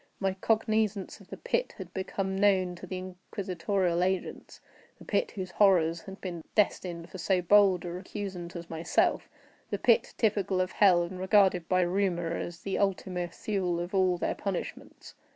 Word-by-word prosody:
My 195 Hz, -1 st, 0 dB
cognizance 215 Hz, 0 st, 0 dB
of -, -, -16 dB
the -, -, -8 dB
pit -, -, -2 dB
had 185 Hz, -2 st, -9 dB
become 190 Hz, 0 st, -3 dB
known 190 Hz, -2 st, +3 dB
to 185 Hz, -, -9 dB
the 185 Hz, -, -4 dB
inquisitorial 185 Hz, -1 st, -2 dB
agents—the 185 Hz, 0 st, -5 dB
pit, -, -, 0 dB
whose 185 Hz, -3 st, -6 dB
horrors 170 Hz, -5 st, +3 dB
had 195 Hz, 0 st, -10 dB
been 175 Hz, -4 st, -5 dB
destined 175 Hz, -5 st, 0 dB
for 185 Hz, -, -8 dB
so 185 Hz, +1 st, +2 dB
bold 190 Hz, 0 st, +4 dB
a -, -, -3 dB
recusant 185 Hz, -1 st, -6 dB
as 170 Hz, -1 st, -7 dB
myself—the 165 Hz, +1 st, -2 dB
pit, -, -, +2 dB
typical 200 Hz, -4 st, +1 dB
of 185 Hz, 0 st, 0 dB
hell, 180 Hz, -4 st, +5 dB
and 180 Hz, +2 st, -6 dB
regarded 190 Hz, -3 st, +3 dB
by 185 Hz, 0 st, +3 dB
rumor 175 Hz, -2 st, 0 dB
as 170 Hz, 0 st, -6 dB
the 195 Hz, -, -2 dB
Ultima 185 Hz, -3 st, -1 dB
Thule 180 Hz, -1 st, -2 dB
of 175 Hz, +2 st, -5 dB
all 185 Hz, -2 st, +3 dB
their -, -, -1 dB
punishments. 195 Hz, -3 st, -6 dB
185 Hz, 160 wpm, -29 LUFS, 175-195 Hz, -, hell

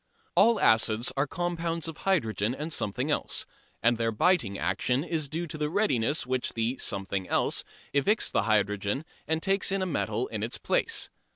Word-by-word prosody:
All 230 Hz, +1 st, +5 dB
acids 110 Hz, +2 st, +3 dB
are 135 Hz, +2 st, +1 dB
compounds 170 Hz, -1 st, -2 dB
of 160 Hz, -1 st, -6 dB
hydrogen 115 Hz, -, 0 dB
and 155 Hz, +3 st, -4 dB
something 100 Hz, -, -1 dB
else, -, -, 0 dB, 0.4 s
and 115 Hz, +1 st, +4 dB
their 115 Hz, 0 st, +1 dB
biting 110 Hz, -, +2 dB
action 115 Hz, -, 0 dB
is 160 Hz, -4 st, -2 dB
due 165 Hz, +4 st, -2 dB
to 155 Hz, -1 st, -7 dB
the 150 Hz, 0 st, 0 dB
readiness 150 Hz, -, +1 dB
with 130 Hz, -, -10 dB
which -, -, -3 dB
the 115 Hz, +3 st, -1 dB
"something 95 Hz, -2 st, -2 dB
else" -, -, +1 dB, 0.3 s
evicts 200 Hz, +11 st, +2 dB
the -, -, +2 dB
hydrogen 105 Hz, +5 st, +1 dB, 0.2 s
and 160 Hz, +1 st, 0 dB
takes 195 Hz, 0 st, +2 dB
in 195 Hz, -1 st, 0 dB
a -, -, 0 dB
metal 185 Hz, -, -1 dB
in -, -, -4 dB
its -, -, -2 dB
place. 455 Hz, -3 st, 0 dB
145 Hz, 180 wpm, -28 LUFS, 110-175 Hz, 0.4 s, All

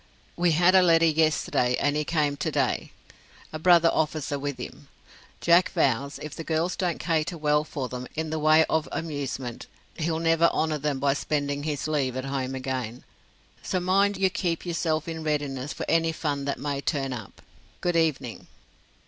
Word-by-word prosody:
"We 175 Hz, -1 st, +2 dB
had 175 Hz, +3 st, +4 dB
a 190 Hz, -, +7 dB
letter 165 Hz, -2 st, +5 dB
yesterday, 155 Hz, -6 st, +2 dB
and 145 Hz, +1 st, +1 dB
he 150 Hz, -, +1 dB
came 150 Hz, -2 st, 0 dB
to -, -, -2 dB
day -, -, 0 dB, 0.6 s
a 155 Hz, -, -4 dB
brother 170 Hz, 0 st, +5 dB
officer 150 Hz, -2 st, -1 dB
with 145 Hz, -1 st, -3 dB
him. -, -, -9 dB, 0.5 s
Jack 170 Hz, +1 st, +5 dB
vows 140 Hz, +2 st, +1 dB
if 150 Hz, -1 st, -7 dB
the 165 Hz, -, -6 dB
girls 165 Hz, +3 st, 0 dB
don't 180 Hz, -4 st, -1 dB
cater 165 Hz, +1 st, -1 dB
well 150 Hz, -1 st, +2 dB
for 140 Hz, -4 st, -4 dB
them 125 Hz, 0 st, -6 dB
in 160 Hz, 0 st, -3 dB
the 160 Hz, -, -1 dB
way 155 Hz, +1 st, +5 dB
of 160 Hz, 0 st, 0 dB
amusement, 140 Hz, -6 st, -4 dB, 0.3 s
he'll 160 Hz, 0 st, -1 dB
never 165 Hz, 0 st, +3 dB
honor 155 Hz, -1 st, 0 dB
them 145 Hz, -1 st, -1 dB
by 140 Hz, +1 st, +2 dB
spending 145 Hz, 0 st, -2 dB
his 150 Hz, -1 st, -3 dB
leave 135 Hz, -5 st, 0 dB
at 130 Hz, -, -3 dB
home 135 Hz, -1 st, -3 dB
again; 130 Hz, -3 st, -4 dB, 0.6 s
so 185 Hz, -, -1 dB
mind 195 Hz, +2 st, +2 dB
you 190 Hz, -1 st, +2 dB
keep 170 Hz, -2 st, -2 dB
yourself 165 Hz, -2 st, -1 dB
in 160 Hz, -1 st, -5 dB
readiness 145 Hz, -2 st, -2 dB
for -, -, -5 dB
any 165 Hz, 0 st, +2 dB
fun 145 Hz, -3 st, -2 dB
that 140 Hz, -, -2 dB
may 140 Hz, -1 st, -3 dB
turn 135 Hz, -3 st, -1 dB
up. 110 Hz, -5 st, -9 dB, 0.4 s
Good 175 Hz, -1 st, 0 dB
evening." 155 Hz, -8 st, -1 dB
155 Hz, 180 wpm, -26 LUFS, 140-165 Hz, 0.6 s, a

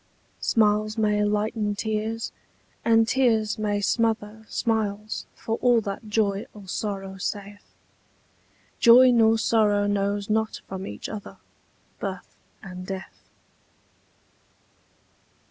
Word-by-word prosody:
Smiles 215 Hz, 0 st, +2 dB
may 210 Hz, -1 st, +2 dB
lighten 210 Hz, 0 st, 0 dB
tears, 220 Hz, +2 st, -2 dB, 0.5 s
and 225 Hz, -1 st, +4 dB
tears 225 Hz, -5 st, +2 dB
may 205 Hz, -1 st, 0 dB
smother 220 Hz, 0 st, -1 dB
Smiles, 215 Hz, -2 st, -2 dB
for 225 Hz, 0 st, -3 dB
all 245 Hz, -2 st, +4 dB
that 200 Hz, +2 st, -6 dB
joy 205 Hz, -2 st, 0 dB
or 205 Hz, -2 st, -12 dB
sorrow 195 Hz, -1 st, -4 dB
saith: 205 Hz, +1 st, -6 dB, 1.0 s
Joy 250 Hz, +1 st, +8 dB
nor 225 Hz, -2 st, +4 dB
sorrow 210 Hz, -3 st, +2 dB
knows 200 Hz, 0 st, 0 dB
not 220 Hz, 0 st, 0 dB
from 190 Hz, 0 st, -6 dB
each 105 Hz, -, -6 dB
other 210 Hz, -2 st, -8 dB, 0.6 s
Birth -, -, -6 dB, 0.3 s
and 185 Hz, -1 st, -8 dB
death. 190 Hz, -1 st, -8 dB
210 Hz, 105 wpm, -25 LUFS, 205-225 Hz, 1.0 s, Joy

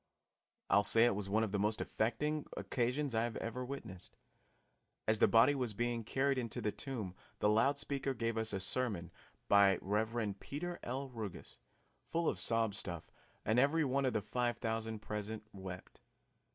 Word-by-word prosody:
I'll 100 Hz, -, +5 dB
say 115 Hz, +3 st, +6 dB
it 120 Hz, -, +4 dB
was 100 Hz, -1 st, -3 dB
one 110 Hz, +3 st, +3 dB
of 110 Hz, -, -2 dB
the 100 Hz, -, 0 dB
most 105 Hz, +2 st, +1 dB
affecting 145 Hz, +7 st, -1 dB
occasions 130 Hz, +2 st, -1 dB
I 110 Hz, 0 st, +2 dB
have 120 Hz, -, -4 dB
ever 115 Hz, +3 st, -3 dB
witnessed. 115 Hz, -9 st, -7 dB, 0.9 s
As 110 Hz, 0 st, +3 dB
the -, -, +6 dB
body 115 Hz, +5 st, +6 dB
was 125 Hz, -6 st, -2 dB
being 120 Hz, +1 st, -1 dB
carried 135 Hz, +4 st, +1 dB
into 115 Hz, -3 st, -3 dB
the 105 Hz, -, 0 dB
tomb 115 Hz, -10 st, -5 dB, 0.2 s
the -, -, +2 dB
loud 115 Hz, +7 st, +4 dB
speaker 140 Hz, -1 st, -1 dB
gave 115 Hz, -1 st, -1 dB
us 110 Hz, 0 st, 0 dB
a 100 Hz, -, -1 dB
sermon 100 Hz, -4 st, +1 dB, 0.4 s
by 100 Hz, -1 st, +6 dB
Rev. 105 Hz, 0 st, -1 dB
Peter 175 Hz, +5 st, -5 dB
L. 135 Hz, +3 st, -4 dB
Ruggus, 110 Hz, -7 st, -7 dB, 0.5 s
full 165 Hz, 0 st, 0 dB
of -, -, 0 dB
sob 115 Hz, -2 st, +2 dB
stuff, 85 Hz, -4 st, -6 dB, 0.3 s
and 110 Hz, +3 st, +3 dB
every 150 Hz, +4 st, +3 dB
one 135 Hz, +1 st, +1 dB
of 130 Hz, -, +1 dB
the 105 Hz, -, 0 dB
five 120 Hz, +3 st, -1 dB
thousand 110 Hz, -1 st, -3 dB
present 105 Hz, +1 st, -4 dB
wept. 95 Hz, -2 st, -8 dB
115 Hz, 175 wpm, -35 LUFS, 105-130 Hz, 0.9 s, say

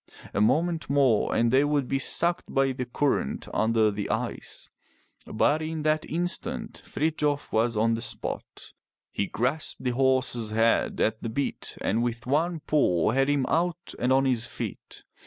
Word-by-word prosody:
A -, -, +1 dB
moment 160 Hz, +8 st, +1 dB
more 135 Hz, -6 st, +3 dB
and 115 Hz, 0 st, +3 dB
they 135 Hz, +2 st, +5 dB
would 145 Hz, -3 st, +1 dB
be 135 Hz, -, 0 dB
sucked 170 Hz, +5 st, 0 dB
by 135 Hz, 0 st, +2 dB
the 125 Hz, -1 st, -4 dB
current 135 Hz, -, -1 dB
under 110 Hz, -1 st, +3 dB
the 100 Hz, 0 st, -4 dB
ice. 115 Hz, +3 st, -3 dB, 0.6 s
But 155 Hz, +2 st, +2 dB
in 160 Hz, -1 st, -3 dB
that 155 Hz, 0 st, +1 dB
instant, 175 Hz, +2 st, -3 dB
Frithjof 150 Hz, -2 st, -1 dB
was 115 Hz, 0 st, +2 dB
on 115 Hz, +2 st, +3 dB
the 115 Hz, -, -2 dB
spot. 110 Hz, -2 st, -5 dB, 0.4 s
He 100 Hz, -, -1 dB
grasped 130 Hz, +7 st, -1 dB
the 125 Hz, -, +1 dB
horse's 130 Hz, -3 st, +1 dB
head 115 Hz, +1 st, +2 dB
at 110 Hz, 0 st, +1 dB
the 115 Hz, -, -3 dB
bit, 140 Hz, +5 st, -3 dB
and 110 Hz, +4 st, +1 dB
with 120 Hz, 0 st, -2 dB
one 160 Hz, +5 st, 0 dB
pull 100 Hz, -, +2 dB
had 135 Hz, +3 st, +2 dB
him 145 Hz, -2 st, +2 dB
out 175 Hz, +1 st, -1 dB
and 125 Hz, +1 st, +1 dB
on 135 Hz, +1 st, +4 dB
his 120 Hz, -3 st, +1 dB
feet. -, -, -7 dB
130 Hz, 165 wpm, -27 LUFS, 115-150 Hz, 0.6 s, they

